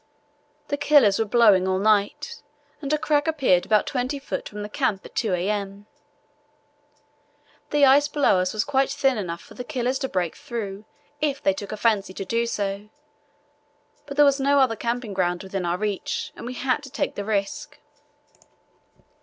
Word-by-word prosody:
The 285 - -1
killers 285 -9 +4
were 225 - +2
blowing 210 -4 +4
all 185 0 +1
night, 210 +8 +1 0.4
and 280 -1 -4
a 305 - +3
crack 295 0 +1
appeared 270 - +2
about 215 -1 +3
20 260 +2 -2
ft. 275 - -5
from 210 0 -7
the - - -5
camp 215 -4 -1
at - - -12
2 215 -6 0
a.m. 200 +2 -3 1.8
The 290 -1 +4
ice 280 +2 +5
below 290 -10 +2
us 185 0 0
was 215 0 0
quite 270 0 +1
thin 270 -1 +1
enough 170 -4 -5
for - - -15
the 250 - -7
killers 255 -1 -2
to 265 - -3
break 175 -3 -1
through 210 -3 -6 0.4
if 285 -3 0
they 195 - +3
took 195 +1 -7
a 215 - -4
fancy 205 -4 +1
to 195 - -5
do 230 +4 0
so, 200 -1 -3 1.2
but 280 0 -7
there 295 - +7
was 280 0 +3
no 280 +1 +3
other 255 -4 +3
camping 235 -1 -3
ground 180 -1 -1
within 190 -1 -4
our 175 +1 0
reach 205 -1 -3
and - - -8
we 250 - -5
had 255 +2 0
to 280 - -10
take - - -2
the 205 - -4
risk. 215 +8 -3
225 Hz, 180 wpm, -24 LUFS, 195-275 Hz, 1.8 s, there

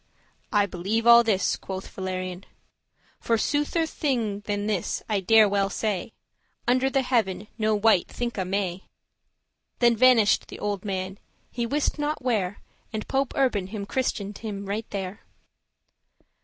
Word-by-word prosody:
"I 205 -3 +4
believe 200 +5 -2
all 235 0 +9
this," 210 -4 +1
quoth 190 0 -6
Valerian, 185 -1 -5 0.7
"For 230 - +1
soother* 295 +6 0
thing 235 -10 -1
than 205 0 -1
this, 210 -5 -1
I 210 -2 +1
dare 215 +3 +6
well 200 -1 +1
say, 200 -3 -1 0.6
*truer 245 - +4
Under 260 +1 +2
the 270 0 +1
Heaven 215 -5 0
no 215 0 +2
wight 210 -3 +3
thinke 235 -5 -3
may." 190 -1 -2 0.9
Then 235 -1 +4
vanish'd 230 -3 +5
the - - -8
old 205 -2 -3
man, 190 -1 -4 0.3
he 235 -1 -2
wist 295 +3 -1
not 295 +1 -1
where 205 -6 -1 0.3
And 215 -2 -4
Pope 270 0 0
Urban 235 -9 +1
him 200 0 -5
christened 210 -4 -2 0.3
right 210 +3 -3
there. 195 +1 -5
210 Hz, 140 wpm, -26 LUFS, 195-240 Hz, 0.9 s, all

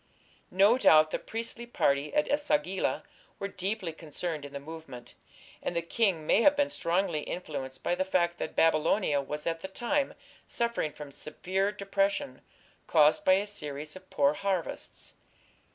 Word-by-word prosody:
No 200 +7 +5
doubt 155 -8 +6
the - - -1
priestly 230 +1 -5
party 140 -10 +1
at 300 - +3
E - - -3
sagila 290 -9 0 0.3
were 200 - -3
deeply 195 -2 -3
concerned 160 -1 -5
in 140 - -9
the 140 - -5
movement, 155 -5 -10 0.5
and 175 - -3
the 170 - 0
king 180 -3 +1
may 220 - +4
have 290 +4 +6
been 285 0 +1
strongly 170 - 0
influenced 140 -5 -6
by - - +1
the 185 +1 +1
fact 175 -2 +1
that - - -4
Babylonia 155 -1 +3
was 150 +2 -5
at 165 -1 -1
the 190 - -6
time 275 +8 -1 0.3
suffering 235 -10 0
from 145 -1 -9
severe 190 +8 -1
depression 195 -9 -1 0.5
caused 150 0 +5
by 185 - +6
a 195 +2 +2
series 150 -7 -6
of 185 0 -13
poor 140 0 +3
harvests. 190 0 -3
175 Hz, 160 wpm, -29 LUFS, 150-200 Hz, 0.5 s, doubt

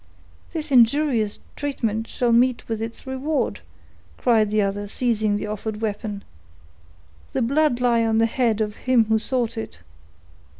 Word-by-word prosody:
"This 315 -2 -5
injurious 240 -3 +3 0.2
treatment 225 -6 -2
shall 245 -1 0
meet 245 +1 +3
with 225 -1 -3
its 225 +3 -6
reward," 265 +3 -2 0.6
cried 225 -4 +3
the 210 0 +2
other, 200 +1 -2
seizing 215 -2 0
the 205 - -4
offered 210 0 -4
weapon. 210 -1 -3 1.1
"The - - +1
blood 280 +1 +2
lie 240 -2 +3
on 225 -1 +1
the 225 - +4
head 225 -2 +1
of 210 -1 -2
him 250 -3 +3
who 220 0 +2
sought 235 0 -1
it!" 220 - -7
230 Hz, 145 wpm, -23 LUFS, 215-255 Hz, 1.1 s, the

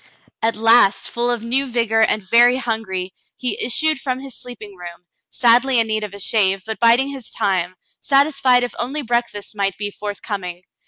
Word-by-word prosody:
At 225 0 +1
last, 225 -2 +3
full 240 +1 -1
of 240 -2 -2
new 265 +4 0
vigor 230 -2 0
and 215 -3 +1
very 240 +4 +5
hungry, 220 -7 -3 0.2
he 250 - -3
issued 310 +5 +1
from 255 -2 -3
his 270 -2 -9
sleeping 225 -5 -10
room, 175 -1 -11 0.2
sadly 245 +1 +3
in 230 - +3
need 215 -1 -2
of 205 -1 -7
a - - -10
shave, 195 -2 +1
but 220 0 -5
biding 235 +4 +4
his 270 -4 -7
time, 185 -2 -1 0.2
satisfied 275 -3 +3
if 245 - -3
only 280 +5 -3
breakfast 235 -4 -2
might 195 -2 -1
be 205 0 -4
forth 205 -1 -7
coming. 180 -4 -5
230 Hz, 180 wpm, -19 LUFS, 205-250 Hz, 0.2 s, very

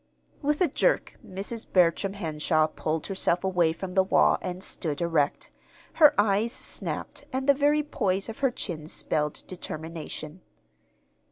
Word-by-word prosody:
With 295 +2 0
a 360 - +5
jerk - - 0
Mrs. 200 +5 -6
Bertram 185 +2 +3
Henshaw 155 -4 +1
pulled 155 0 -3
herself 190 -2 0
away 180 -4 +2
from 180 +3 -6
the 190 - +5
wall 190 - +3
and 185 0 -5
stood 155 -7 -2
erect. 165 -4 0 0.4
Her 300 -2 +6
eyes 205 +2 +2
snapped, - - -4
and 265 +1 -2
the 280 - +7
very 295 +2 +2
poise 200 -10 -1
of 225 - -7
her 270 - +3
chin 170 -10 -5
spelled 150 -2 -1
determination. 160 -1 -7
190 Hz, 145 wpm, -27 LUFS, 160-230 Hz, 0.4 s, the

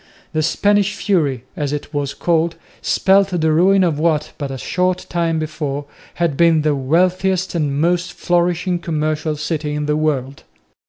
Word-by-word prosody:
The 155 - +1
"Spanish 205 +5 +2
Fury," 150 - 0
as 145 -2 -2
it 145 +1 -5
was 145 -1 -2
called, 170 -1 +1 0.3
spelt 195 0 +3
the 160 0 +2
ruin 190 +4 +4
of 160 -5 0
what, 155 -2 +1
but 140 -2 -3
a 135 - -5
short 180 +6 -1
time 170 -2 0
before, 150 -2 -3 0.3
had 170 -4 0
been 165 -1 +4
the 150 -1 +2
wealthiest 180 +6 +1
and 145 -4 -1
most 175 +2 +1
flourishing 175 +1 0
commercial 155 -1 -1
city 150 0 -3
in 150 0 -2
the 150 0 +1
world. 140 -3 -1
160 Hz, 160 wpm, -19 LUFS, 150-175 Hz, 0.3 s, ruin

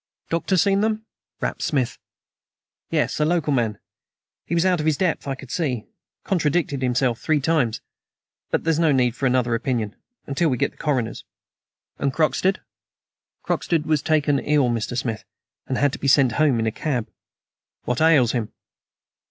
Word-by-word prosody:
"Doctor 170 +3 +1
seen 195 +2 +3
them?" 220 0 -1 0.4
rapped - - -2
Smith. 130 -5 -1 0.9
"Yes; - - 0
a - - +3
local 155 -2 +1
man. 115 -5 0 0.7
He 170 - -1
was 170 +2 +2
out 180 -2 +3
of 155 - -1
his 155 -3 +2
depth, 180 -6 0
I 135 - -1
could 130 -1 -11
see. 130 -10 -1 0.4
Contradicted 150 -5 0
himself 125 -1 +1
three 155 -2 +2
times. 135 -7 +1 0.7
But - - 0
there's 165 -1 +1
no 165 -2 +4
need 125 -3 +2
for 135 - 0
another 125 -2 +1
opinion 115 -3 -1 0.3
until 155 +4 +1
we 125 - 0
get - - 0
the - - -29
coroner's." 125 -7 -1 0.8
"And 140 - +1
Croxted?" 165 +6 +1 0.8
"Croxted 165 -3 0
was 155 -2 +1
taken 150 -2 +2
ill, 145 -4 +2
Mr. 120 +1 -2
Smith, 115 -4 -2 0.4
and 130 - -1
had 145 -1 +2
to - - -5
be 140 - -2
sent 135 -2 +5
home 140 +1 +2
in 115 - 0
a 110 - +1
cab." 125 -2 -2 0.8
"What 125 +2 -1
ails 150 -8 +5
him?" 115 -4 -2
140 Hz, 170 wpm, -23 LUFS, 125-160 Hz, 0.9 s, sent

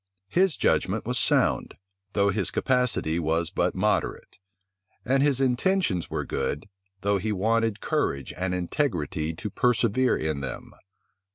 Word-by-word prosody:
His 185 - +2
judgment - - +1
was - - 0
sound, - - +2 0.4
though 100 -1 +3
his 100 -2 0
capacity 125 -11 +1
was 80 +1 0
but 90 -2 0
moderate; 105 +3 -1 0.7
and 135 +2 +2
his 140 -2 +3
intentions 130 - +1
were - - -3
good, 75 +5 -3 0.3
though 100 +1 +1
he 110 +3 -2
wanted 110 +2 +1
courage 70 -1 -1
and 90 0 -2
integrity 85 - -1
to 105 - -5
persevere 125 +2 +2
in 75 -2 -2
them. 70 - -6
100 Hz, 130 wpm, -26 LUFS, 85-125 Hz, 0.7 s, though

